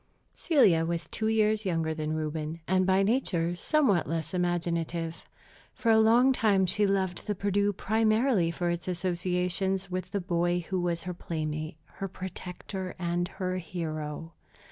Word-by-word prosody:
Celia 205 - +4
was 170 0 -2
two 220 - -2
years 215 -1 +2
younger 165 -4 0
than 155 0 -2
Reuben, 155 +1 -3
and 185 0 +2
by 190 +1 +4
nature 185 -7 +1
somewhat 210 - +2
less 165 0 -3
imaginative. 170 -2 -2 0.4
For 230 - +1
a 220 - +6
long 235 +4 +5
time 205 -6 +3
she 205 +3 +2
loved 190 -2 -1
the 210 - 0
Perdu 200 +1 +1
primarily 220 -1 +2
for 175 +1 -1
its 175 +1 -4
associations 180 +1 -1
with 185 0 -3
the 200 - -1
boy 175 -1 0
who 190 -1 -1
was 170 -1 -1
her 180 - -4
playmate, 155 -2 -4
her 195 - -6
protector, 185 0 -6
and 175 0 -1
her 185 -1 -3
hero. 160 -2 -5
180 Hz, 150 wpm, -29 LUFS, 170-200 Hz, 0.4 s, a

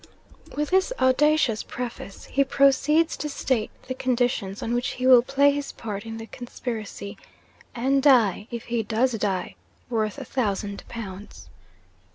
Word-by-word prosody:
'With 295 +2 -1
this 380 +4 +3
audacious 265 -3 +3
preface, 240 -5 -7
he 275 - +2
proceeds 275 +4 +3
to 300 - -4
state 260 -5 -1 0.2
the 255 - -2
conditions 245 -6 -1
on 230 - -2
which 245 +1 0
he 255 - -4
will 255 -2 +8
play 275 +3 +3
his 285 0 -3
part 210 -1 -6
in 225 0 -6
the 225 - -7
conspiracy, 225 -4 -6 0.6
and 270 +3 +2
die 230 -8 +4
(if 235 -2 -5
he 235 -1 -1
does 225 +4 +1
die) 200 -5 -2 0.4
worth 215 -1 -1
a 275 - -6
thousand 205 -5 -2
pounds. 200 - -8
245 Hz, 150 wpm, -25 LUFS, 215-275 Hz, 0.6 s, will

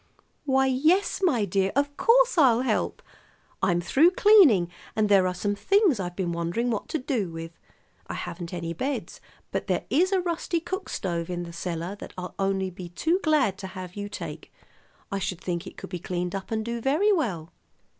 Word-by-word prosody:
"Why, 265 -1 +3
yes, 310 +10 +2
my 260 - +2
dear, 195 0 +1
of 285 +1 +1
course, - - +4
I'll 255 -8 +5
help. 260 - -1 0.6
I'm 180 -3 +2
through 275 - +4
cleaning, 340 - +6 0.3
and 215 -1 +2
there 195 -2 +5
are 180 - -1
some 205 +3 -1
things 380 - +3
I've 175 -2 -4
been 180 -2 -2
wondering 170 +9 -1
what 215 - -3
to - - 0
do 250 - -2
with. 165 0 -7 0.6
I - - -5
haven't 170 0 -6
any 170 -2 -4
beds, 270 - -4 0.3
but - - -3
there - - 0
is 365 +5 +3
a 385 - +3
rusty 340 -1 -1
cook 375 +3 -5
stove 170 -3 -3
in 175 -1 -3
the 170 -1 -9
cellar 170 +2 -4
that - - -9
I'll 180 0 -5
be - - -25
only 190 -2 -2
too 335 - +1
glad 275 - +2
to 190 - -5
have 185 -1 -8
you 205 0 -5
take. - - -7 0.6
I 195 - -1
should 185 -2 -3
think 175 -2 -4
it - - -11
could - - -9
be 180 - -4
cleaned 180 0 -3
up 195 -1 -5
and 220 -1 -2
do 235 0 -3
very 305 - +3
well." 185 - -2
205 Hz, 195 wpm, -26 LUFS, 180-290 Hz, 0.6 s, cleaning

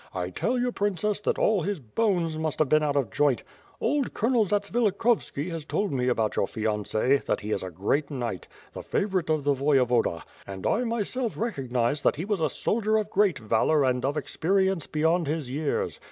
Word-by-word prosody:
1 90 -1 -3
tell 240 - -1
you. 245 0 0
Princess, 205 -1 -1
that 210 - -1
all 210 -4 +2
his 195 +1 -2
bonee 170 - 0
must 155 -3 -2
have 155 - +2
been 155 +3 +4
out 145 -1 0
of 130 -8 0
joint. 145 -1 +2 0.4
Old 280 +2 0
Colonel 230 -1 +2
Zats 205 +1 -1
vilikhovski 215 -7 +1
has 165 -2 -4
told 200 +6 -1
me 125 -2 0
about 115 -4 +1
your 100 - +1
fiance; 110 +4 0
that - - -2
he 105 +1 -5
is 100 - 0
a 95 - -5
great 100 - -1
knight, 120 - -4 0.3
the - - -6
favorite 190 -5 -1
of 155 -2 +1
the 145 0 +3
Voyevoda; 125 - +2 0.2
and 95 -1 -7
I 245 - +1
myself 235 +1 -2
recognized 135 - -1
that - - +3
he 160 +5 -4
was 205 -2 -1
a 155 - +2
soldier 215 - 0
of 215 -1 -2
great 200 -5 +3
valor 110 +7 +2
and 125 -1 0
of 140 +3 0
experience 190 +3 0
beyond 160 +2 +1
his 150 -4 -2
years. 145 +2 -2
155 Hz, 195 wpm, -26 LUFS, 125-205 Hz, 0.4 s, been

